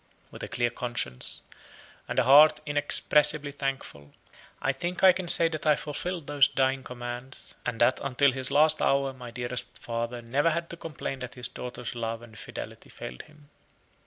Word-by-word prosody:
With - - -10
a - - -4
clear 120 0 -1
conscience, 120 - -3 0.6
and - - -5
a - - +5
heart 150 +4 +7
inexpressibly 145 0 +3
thankful, 135 - -5 0.5
I 135 - 0
think 175 +7 -4
I 190 - +9
can 180 0 -4
say 170 0 +6
that 155 -1 -4
I 150 - +6
fulfilled 165 +3 -4
those 145 -1 +4
dying 135 0 0
commands, 125 +1 -7
and 120 -2 -3
that 125 +2 +4
until 140 +1 +2
his 130 0 0
last 155 +1 +3
hour 135 -1 +2
my 125 -2 -10
dearest 120 +1 -5
father 120 0 -4
never 140 +8 +1
had 170 +1 -3
to - - -5
complain 150 -5 -6
that 125 -1 -7
his 125 -1 +2
daughter's 125 -1 -6
love 115 -1 -4
and 115 -2 -14
fidelity - - -9
failed 60 - -8
him. 150 -1 -21
135 Hz, 175 wpm, -27 LUFS, 120-150 Hz, 0.6 s, I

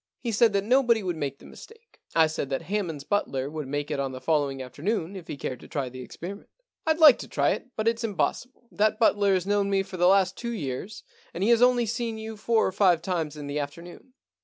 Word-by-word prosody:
He 235 - -3
said 225 +1 +4
that 200 -1 +1
nobody 235 -1 +3
would 180 -2 -2
make 140 -3 -4
the - - -17
mistake. 455 +1 -15 0.2
I 165 -1 +6
said 155 -3 -3
that 135 - -2
Hammond's 175 -8 -3
butler 140 -8 -1
would 155 -3 -5
make 145 +2 -3
it 145 - -1
on 135 -1 -2
the 130 - -6
following 145 -3 0
after 130 +2 -9
noon, 195 -1 -1
if 180 -4 -9
he - - -6
cared 130 -2 -5
to - - -13
try 140 -5 -3
the 130 +1 -9
experiment. 185 +10 -9 0.2
* - - -66
" - - -5
rd 315 - +3
like 315 -3 +8
to - - -7
try - - +1
it, - - -4
but 215 +1 -2
it's 230 0 +1
impossible. 240 +3 -2
That 215 +1 +1
butler 205 -3 +3
has 185 -1 -1
known 200 0 +1
me 195 -1 +2
for 190 -1 -9
the 175 0 +4
last 190 0 +4
two 235 -1 -4
years, 170 - -5 0.3
and 175 - -2
he 225 - +4
has 235 0 +4
only 245 -1 +4
seen 230 0 -3
you 220 0 -6
four 220 +1 +1
or - - 0
five 180 -4 +3
times 165 -5 -2
in 145 - -7
the 145 +1 -3
afternoon. 170 - -8
195 Hz, 255 wpm, -26 LUFS, 150-225 Hz, 0.3 s, like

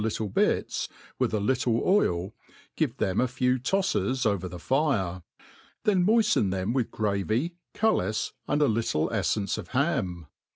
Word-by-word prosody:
little 110 -1 -2
bits, - - 0 0.3
with - - +1
a 110 - 0
little 120 +3 +1
wl, 100 - +1 0.4
give - - -1
them 95 +3 +1
a 130 - +2
few 125 +1 +1
tofles 130 - 0
over 100 -4 0
the 90 - -7
fire; 100 - 0 0.6
then 190 -4 +3
nioifteii 215 - +3
them 95 +4 -1
with 125 -3 0
gravy, 110 - -1 0.2
cullis, 110 - +1 0.2
and 145 0 +2
a - - +4
little 110 -9 0
eilence 100 -3 0
of - - -7
ham. 130 - -1
115 Hz, 150 wpm, -27 LUFS, 95-140 Hz, 0.6 s, a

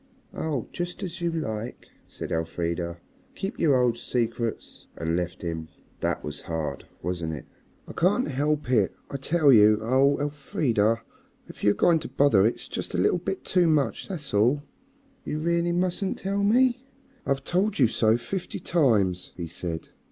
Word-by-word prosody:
"Oh, 145 -7 -2
just 175 0 -4
as 180 -1 -6
you 170 - +1
like," 120 -8 -4 0.2
said - - -7
Elfrida; 85 +1 -2 0.4
"keep 195 +4 -4
your 150 -5 +4
old 120 -2 +2
secrets," 115 -2 -3
and 80 0 -1
left 90 0 -3
him. 80 -2 -3 0.3
That - - -1
was 75 -1 -6
hard, 80 -4 -3 0.2
wasn't 85 -2 -2
it? 75 - -7 0.4
"I - - -8
can't 195 +9 +2
help 145 0 0
it, 105 -7 +3 0.2
I 140 - -2
tell 145 0 +4
you. 105 -1 +7
Oh! 130 +5 +3
Elfrida, 125 -6 0 0.4
if - - -12
you're 105 - +4
going 170 -2 +4
to - - -6
bother 130 -7 +4
it's 115 - -4
just - - -4
a - - +1
little 100 - +3
bit 185 +2 -4
too 180 -2 +3
much, 150 -3 +1
that's 155 - -5
all." 120 +8 +3 0.6
"You 150 - -3
really 170 +2 +1
mustn't 180 +2 0
tell 200 +1 -1
me?" 250 +4 +3 0.4
"I've 135 0 0
told 195 +6 +1
you 135 - +6
so 110 0 +3
fifty 185 +9 -4
times," 105 - +1
he 85 - -3
said. 85 0 -5
130 Hz, 165 wpm, -26 LUFS, -, 0.6 s, you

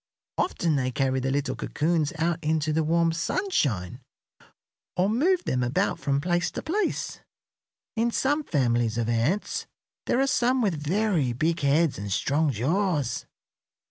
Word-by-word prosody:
Often 165 - +1
they 130 -1 0
carry 130 +1 0
the 130 +1 -1
little 140 +1 -1
cocoons 160 -1 0
out 170 +1 0
into 155 0 +1
the 160 +1 +2
warm 165 +1 +2
sunshine 140 - -1 1.0
or 180 +2 +3
move 335 - +2
them 125 - 0
about 120 +2 0
from 140 -1 0
place 175 +2 0
to - - -5
place. 390 +4 -1 0.8
In 230 +1 +2
some 290 +5 +1
families 120 - +1
of 115 -2 0
ants 120 - 0 0.4
there 245 - +2
are 270 - +4
some 255 -1 +2
with 205 -7 +2
very 180 - +1
big 160 +7 0
heads 145 0 +2
and 100 0 -5
strong 145 +8 +1
jaws. 145 - 0
160 Hz, 145 wpm, -26 LUFS, 130-195 Hz, 1.0 s, are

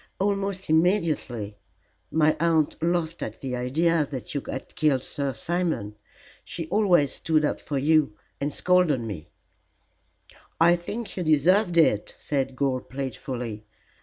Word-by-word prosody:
"Almost 195 -1 -1
immediately. 155 - +1 0.5
My 155 -1 +3
aunt 160 -2 +2
laughed 170 0 -1
at 110 - -5
the 130 -2 -4
idea 155 +6 +1
that 130 -4 -6
you 140 - -1
had 130 - -6
killed 140 -5 +2
Sir 140 -1 -2
Simon. 170 - -2 0.5
She 165 - -5
always 180 -9 +3
stood 155 -1 +1
up - - -1
for 145 - -3
you, 150 -4 +3 0.2
and 145 +1 -1
scolded 180 -5 +3
me." 95 -8 -6 1.3
"I 170 +2 +6
think 210 +6 -6
you - - -1
deserved 175 +4 +3
it," 105 -11 +3
said 135 -2 -2
Gore, 130 -1 0
playfully. 125 -4 -5
155 Hz, 135 wpm, -25 LUFS, 130-175 Hz, 1.3 s, I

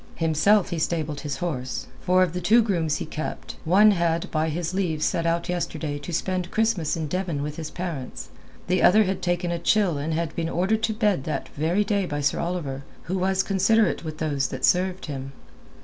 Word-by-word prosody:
Himself 165 +5 +3
he 170 - -1
stabled 155 -2 -1
his 145 -2 -4
horse; 130 -8 -3 0.2
for 185 0 +4
of 175 -3 -1
the 180 - -3
two 225 +7 +5
grooms 170 -8 0
he - - -3
kept, 155 0 -6
one 200 +6 +6
had 170 -3 0
by 155 0 +1
his 170 +2 -3
leave 170 -5 -1
set 170 0 +1
out 170 0 0
yesterday 160 -4 -3
to 145 - -7
spend 180 +1 -1
Christmas 215 -9 +1
in 160 - -2
Devon 170 -4 -2
with 150 0 -5
his 160 -2 -5
parents, 170 -8 -5 0.4
the 180 0 +1
other 215 +4 +6
had 190 -1 -2
taken 175 0 0
a 170 - -2
chill 180 -3 +2
and 155 +3 -2
had 165 -1 -2
been 165 -1 -1
ordered 190 +6 +1
to 220 - 0
bed 210 - +1
that 155 - -3
very 165 +7 0
day 200 -2 0
by 145 -2 -3
Sir 140 -1 +1
Oliver, 165 -6 -3 0.2
who 185 +2 -2
was 190 +1 +1
considerate 205 +2 +2
with 155 -1 -6
those 145 -4 0
that 130 -1 -1
served 185 +1 +1
him. 135 -2 -6
170 Hz, 205 wpm, -25 LUFS, 155-185 Hz, 0.4 s, one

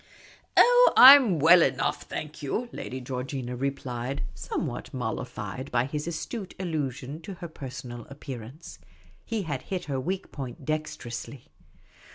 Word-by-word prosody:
" - - -26
Oh, - - +7
I 265 +3 +13
'm 235 - +3
we// 170 +4 +7
enough, 130 -1 0
thank 155 0 -7
you," 220 - -2
Lady 130 - -6
Georgina 125 0 -4
re 135 +3 0
plied, 130 0 -5
somewhat - - -4
mollified 130 +2 -4
by 120 0 +2
his 150 +3 -4
astute 185 +5 -5
allusion 150 -4 -3
to 195 +2 -8
her 175 0 -7
per 150 -4 -8
sonal 125 -2 -8
appearance. 135 +1 -9 0.4
He 225 -3 -3
had 145 -6 -3
hit 185 +3 -4
her 135 -3 -2
weak 185 +8 -4
point 135 +1 -7
dexterously. 140 -4 -5
140 Hz, 150 wpm, -27 LUFS, 130-170 Hz, 0.4 s, I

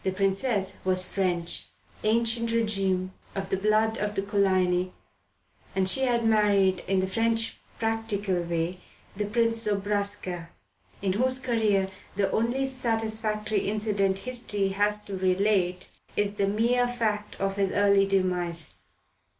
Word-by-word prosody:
The 190 - +1
Princess 195 +1 0
was 185 -1 +2
French, 175 -3 -1 0.4
ancien 230 +1 +2
regime, 195 -5 0 0.2
of 195 -1 -3
the - - +3
blood 215 +3 +2
of 210 0 -2
the 195 - 0
Coligny, 185 -3 +1 0.8
and 190 -1 +2
she 225 - +2
had 235 -2 +1
married, 200 -4 +3
in 190 0 +2
the - - +1
French 225 +3 0 0.2
practical 215 -5 -1
way, 170 +1 -2 0.4
the 210 +1 -1
Prince 230 +1 +1
Zobraska, 200 -4 -1 0.5
in 190 -2 +1
whose 255 +5 +2
career 215 -7 +1 0.2
the 195 -1 +1
only 240 +4 +1
satisfactory 220 -5 -1
incident 205 -2 0
history 210 -3 -2
has 205 +2 +1
to 200 - -6
relate 185 -1 +1 0.3
is 205 0 +1
the 200 -1 0
mere 235 +4 +2
fact 215 -4 -2
of 195 0 -2
his 195 -1 +2
early 200 0 +4
demise. 180 -3 0
205 Hz, 135 wpm, -27 LUFS, 190-225 Hz, 0.8 s, early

